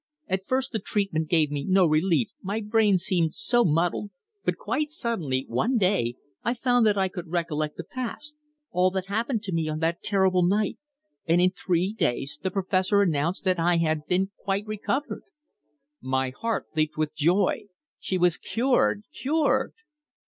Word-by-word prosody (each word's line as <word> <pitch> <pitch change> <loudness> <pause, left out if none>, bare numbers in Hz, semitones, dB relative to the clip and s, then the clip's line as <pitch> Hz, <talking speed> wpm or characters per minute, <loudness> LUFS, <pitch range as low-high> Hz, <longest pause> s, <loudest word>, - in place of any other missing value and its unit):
At 190 0 -2
first, 265 +1 0
the 220 - -1
treatment 190 -6 -1
gave 155 -4 +3
me 145 -1 -2
no 185 +3 +4
relief, 155 -4 +2
my 200 +3 -2
brain 210 -2 +3
seemed 170 -2 0
so 240 +3 +3
muddled, 175 +4 +1 0.3
but - - 0
quite 300 0 -2
suddenly 180 - -2
one 245 +3 +1
day 185 - +1 0.3
I 235 - 0
found 245 -1 +3
that 205 -1 +2
I 190 -1 +2
could 180 -2 -7
recollect 155 -3 -2
the - - -5
past 265 +4 -6 0.4
all 180 +1 +3
that 190 -1 -2
happened 225 +3 -1
to 195 - -4
me 165 -2 0
on 155 - -2
that 165 +1 0
terrible 190 -3 +2
night. 200 +3 +1 0.5
And 165 +2 +4
in 180 +1 +4
three 185 +1 -1
days 135 - -1
the 190 - -1
Professor 190 +1 +2
announced 170 0 0
that 185 -2 +1
I 170 +1 +3
had 155 -2 +1 0.4
quite 200 +1 -2
recovered!" 215 +7 -3 0.8
My 130 0 -1
heart 230 - -2
leapt 155 -1 0
with 155 -1 -1
joy! 170 +6 +1 0.3
She 185 - -2
was 175 -2 +3
cured! 235 -4 +1
cured! 295 +2 0
185 Hz, 165 wpm, -26 LUFS, 165-215 Hz, 0.8 s, no